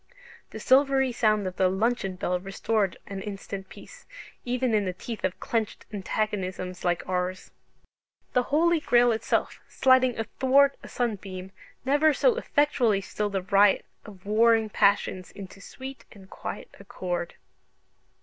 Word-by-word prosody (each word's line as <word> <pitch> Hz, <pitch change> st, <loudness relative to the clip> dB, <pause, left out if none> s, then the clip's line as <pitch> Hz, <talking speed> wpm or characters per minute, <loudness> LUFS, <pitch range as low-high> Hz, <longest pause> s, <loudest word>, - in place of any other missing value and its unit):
The -, -, -8 dB
silvery 265 Hz, 0 st, +3 dB
sound 215 Hz, -4 st, +1 dB
of 185 Hz, 0 st, -5 dB
the 185 Hz, -1 st, +3 dB
luncheon 195 Hz, 0 st, -1 dB
bell 180 Hz, 0 st, -1 dB
restored 195 Hz, +1 st, -1 dB
an 195 Hz, -1 st, -6 dB
instant 195 Hz, -1 st, -7 dB
peace, -, -, -14 dB, 0.4 s
even 250 Hz, -1 st, -1 dB
in 210 Hz, -2 st, +2 dB
the 185 Hz, -, -2 dB
teeth 220 Hz, +4 st, -7 dB
of 185 Hz, -1 st, -2 dB
clenched 225 Hz, -2 st, -3 dB
antagonisms 190 Hz, -3 st, -3 dB
like 175 Hz, -1 st, -1 dB
ours. 185 Hz, 0 st, -3 dB, 0.8 s
The 250 Hz, -, +4 dB
Holy 330 Hz, +3 st, +3 dB
Grail 245 Hz, -4 st, +4 dB
itself, 225 Hz, -, -1 dB
"sliding 255 Hz, -2 st, +3 dB
athwart 265 Hz, +5 st, +3 dB
a -, -, -11 dB
sunbeam," 195 Hz, -5 st, -4 dB, 0.3 s
never 290 Hz, +2 st, +3 dB
so -, -, +3 dB
effectually 270 Hz, -, +1 dB
stilled 205 Hz, +1 st, -3 dB
a 190 Hz, -, -1 dB
riot 200 Hz, +1 st, +4 dB, 0.2 s
of 195 Hz, -3 st, -14 dB
warring 225 Hz, +1 st, +3 dB
passions 200 Hz, -3 st, +1 dB
into 195 Hz, 0 st, -11 dB
sweet 265 Hz, +7 st, -9 dB
and 195 Hz, -3 st, -15 dB
quiet -, -, -7 dB
accord. 180 Hz, -3 st, -4 dB
210 Hz, 140 wpm, -26 LUFS, 190-250 Hz, 0.8 s, The